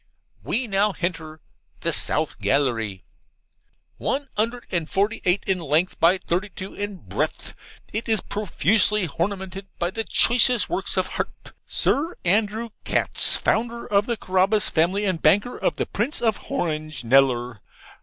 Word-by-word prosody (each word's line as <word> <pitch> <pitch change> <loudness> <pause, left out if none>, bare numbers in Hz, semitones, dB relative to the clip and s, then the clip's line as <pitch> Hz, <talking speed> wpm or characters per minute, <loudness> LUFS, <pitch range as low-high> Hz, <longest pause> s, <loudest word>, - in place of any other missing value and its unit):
We 250 +3 -1
now 205 -1 +1
henter 160 -4 -4 0.4
THE - - 0
SOUTH - - +2
GALLERY. 115 -9 +1 0.9
'One 280 +1 -2
'undred 230 +3 -1
and 170 -3 -1
forty 205 +3 0
eight 180 +2 +2
in 190 -1 0
lenth 165 +3 0
by 175 +3 +5
thirty 185 +2 -2
two 190 +1 -8
in 205 -1 -4
breath; - - -3 0.4
it 225 +2 -3
is 220 -2 +3
profusely 210 +1 +1
hornaminted 190 +4 -4
by 175 +1 -1
the 225 +3 -2
choicest 240 +1 +4
works 350 - -2
of - - +2
Hart. - - -5
Sir 320 +5 0
Andrew 215 +5 +1
Katz, - - +1
founder 235 +1 -1
of 205 +1 +1
the 235 -2 -1
Carabas 195 +2 +1
family 185 +6 +1
and 185 -5 -1
banker 205 +6 +3
of - - -1
the - - -1
Prince 235 +9 -2
of 225 -3 +2
Horange, 155 -4 -3
Kneller. 125 -2 +3
195 Hz, 145 wpm, -23 LUFS, 165-220 Hz, 0.9 s, by